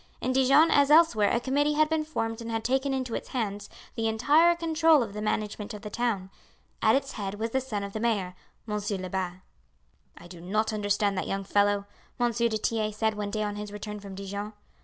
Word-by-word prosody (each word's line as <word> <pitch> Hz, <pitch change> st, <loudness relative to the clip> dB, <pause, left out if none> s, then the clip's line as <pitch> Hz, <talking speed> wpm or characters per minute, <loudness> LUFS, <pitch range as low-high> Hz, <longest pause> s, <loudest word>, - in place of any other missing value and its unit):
In 255 Hz, -, -1 dB
Dijon 275 Hz, +5 st, +5 dB
as 285 Hz, 0 st, +4 dB
elsewhere 300 Hz, -10 st, +5 dB
a 235 Hz, -, +1 dB
committee 285 Hz, +4 st, +1 dB
had 310 Hz, 0 st, +4 dB
been 320 Hz, 0 st, 0 dB
formed 225 Hz, -7 st, -3 dB
and 230 Hz, -, -6 dB
had 225 Hz, -1 st, -2 dB
taken 265 Hz, +3 st, +1 dB
into 255 Hz, -3 st, -2 dB
its -, -, -4 dB
hands 205 Hz, -5 st, -3 dB, 0.2 s
the 225 Hz, 0 st, -1 dB
entire 295 Hz, +10 st, +4 dB
control 325 Hz, -3 st, +3 dB
of 210 Hz, -3 st, -7 dB
the 210 Hz, -, -5 dB
management 210 Hz, 0 st, -3 dB
of 205 Hz, -, -10 dB
the 210 Hz, -, -6 dB
town. 205 Hz, -5 st, -1 dB, 0.5 s
At -, -, +5 dB
its 275 Hz, 0 st, -1 dB
head 200 Hz, -1 st, -4 dB
was 225 Hz, +2 st, -3 dB
the 265 Hz, -, +1 dB
son 215 Hz, -6 st, -4 dB
of 200 Hz, 0 st, -6 dB
the 220 Hz, -, -3 dB
mayor, 210 Hz, -6 st, 0 dB, 0.3 s
Monsieur 210 Hz, -2 st, -2 dB
Lebat. 185 Hz, -1 st, -4 dB, 0.8 s
"I -, -, -13 dB
do 175 Hz, -1 st, -11 dB
not 215 Hz, +5 st, -1 dB
understand 205 Hz, -1 st, 0 dB
that -, -, -3 dB
young 195 Hz, 0 st, -2 dB
fellow," 205 Hz, 0 st, +2 dB, 0.3 s
M. 240 Hz, -1 st, +2 dB
du 235 Hz, 0 st, +1 dB
Tillet 215 Hz, -1 st, -1 dB
said 220 Hz, 0 st, +1 dB
one 210 Hz, -1 st, -4 dB
day 215 Hz, +1 st, -2 dB
on 205 Hz, 0 st, -3 dB
his 210 Hz, 0 st, -6 dB
return 210 Hz, 0 st, -6 dB
from 200 Hz, -1 st, -9 dB
Dijon. 200 Hz, +2 st, -5 dB
220 Hz, 215 wpm, -27 LUFS, 205-260 Hz, 0.8 s, Dijon